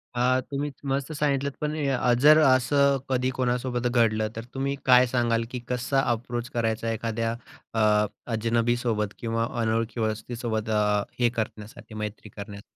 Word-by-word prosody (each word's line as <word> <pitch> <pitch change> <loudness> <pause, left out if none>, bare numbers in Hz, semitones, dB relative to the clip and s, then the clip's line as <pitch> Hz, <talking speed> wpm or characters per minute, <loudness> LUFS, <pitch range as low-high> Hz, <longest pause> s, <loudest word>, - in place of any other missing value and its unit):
हा, 125 +1 +3
तुम्ही 140 +1 -2 0.2
मस्त 140 +3 -1
सांगितलंत, 140 -2 0
पण 150 0 -1
अ, 125 -2 +2
जर 150 +2 +8
असं 135 +2 +4
कधी 130 0 +1
कोणासोबत 125 0 0
घडलं, 110 -3 +2
तर 115 - -5
तुम्ही 135 +1 -1
काय 125 -1 +7
सांगाल? 120 -2 +1
की 125 - -4
कसा 125 +2 +1
अप्रोच 120 +1 -3
करायचा 115 -1 -1
एखाद्या 115 0 -2 0.4
अ, 105 -1 +3 0.3
अजनबी 115 +1 +1
सोबत 105 -4 -1
किंवा 115 0 -1
अनोळखी 115 +1 -1
वस्तीसोबत 110 +1 -2
अ, 105 -1 +2 0.2
हे 120 -1 +4
करण्यासाठी, 110 -1 -6
मैत्री 105 0 -6
करण्यासाठी? 100 0 -9
120 Hz, 145 wpm, -26 LUFS, 110-130 Hz, 0.4 s, जर